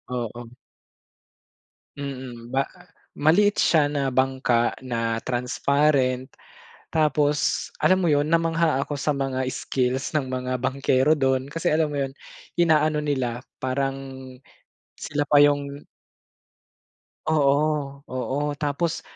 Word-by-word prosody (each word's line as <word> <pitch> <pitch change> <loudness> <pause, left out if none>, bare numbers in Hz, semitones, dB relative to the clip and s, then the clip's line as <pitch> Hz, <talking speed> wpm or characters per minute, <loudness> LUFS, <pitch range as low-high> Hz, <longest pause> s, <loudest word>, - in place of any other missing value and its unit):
Oo. 120 0 -5 1.5
Mm, 130 -4 -7
ba, 135 +1 +1
ah, 180 - -17 0.3
maliit 200 +7 +4
siya 155 -3 +3
na 140 -2 -1
bangka 130 -2 +1
na 115 -2 -1
transparent. 130 +1 +1 0.6
Tapos, 150 -2 +1
alam 185 0 +3
mo 170 - +2
yun, 145 0 +3
namangha 165 -3 +2
ako 145 0 -4
sa 150 +1 0
mga 135 -1 -2
skills 130 +1 -1
ng 135 - -3
mga 130 0 -3
bangkero 135 +2 +2
dun. 130 -2 +1
Kasi, 155 +3 -1
alam 155 +1 +2
mo 140 - 0
yun, 135 - -3 0.5
inaano 155 -2 +3
nila 130 -5 -2 0.2
parang 135 +1 0 1.1
sila 145 0 -1
pa 145 0 +4
yung 145 0 +2 1.4
Oo-oo, 145 -1 0
tapos 150 +3 -2
140 Hz, 110 wpm, -24 LUFS, 130-150 Hz, 1.5 s, maliit